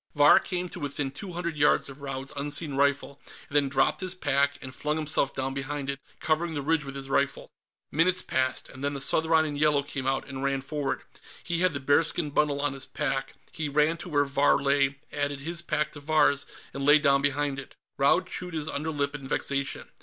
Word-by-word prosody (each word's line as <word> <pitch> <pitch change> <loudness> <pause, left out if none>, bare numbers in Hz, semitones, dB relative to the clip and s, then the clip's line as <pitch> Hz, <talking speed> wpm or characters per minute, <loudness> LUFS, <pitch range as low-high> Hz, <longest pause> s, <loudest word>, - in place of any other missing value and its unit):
Vahr 145 0 +7
came 180 0 -3
to 180 - -8
within 145 -2 -2
two 180 +6 -7
hundred 170 -2 -3
yards 145 0 +3
of 140 +1 -11
Raud's 135 -1 -5
unseen 145 +1 -2
rifle, 140 0 +1 0.3
and 140 - -10
then 145 -2 +3
dropped 140 - +2
his 185 0 0
pack 140 -3 +1
and 130 -1 -9
flung 150 +3 -1
himself 155 -3 0
down 135 0 -2
behind 140 +1 -3
it, 140 - -7 0.2
covering 160 +1 0
the 145 - -2
ridge 160 +1 +1
with 135 0 -7
his 135 -1 -5
rifle. 140 +1 0 0.4
Minutes 180 +4 +2
passed, 130 0 -1
and 130 +1 -11
then 140 0 -1
the - - -3
Southron 160 +3 +3
in 150 -2 -3
yellow 145 -1 +3
came 140 -2 -5
out 135 0 0
and 135 -1 -6
ran 135 -1 0
forward. 145 -1 -3 0.4
He 170 -1 -1
had 180 -3 +2
the - - -1
bearskin 150 +3 +1
bundle 145 -1 +1
on 145 -1 0
his 135 -1 -6
pack; 135 0 -2 0.2
he 155 -2 -3
ran 150 +3 +3
to 175 - -7
where 145 -2 +2
Vahr 140 +1 +3
lay, 140 0 +2 0.2
added 145 -1 -1
his 170 +4 -3
pack 150 -2 -1
to 145 - -9
Vahr's, 145 -2 +2 0.3
and 140 - -4
lay 145 +2 +7
down 140 -2 +3
behind 145 0 0
it. 135 - -11 0.2
Raud 140 +7 +4
chewed 180 -2 -5
his 155 -1 -2
underlip 145 -1 -2
in 135 -2 -7
vexation. 135 -1 -1
145 Hz, 215 wpm, -27 LUFS, 140-155 Hz, 0.4 s, Vahr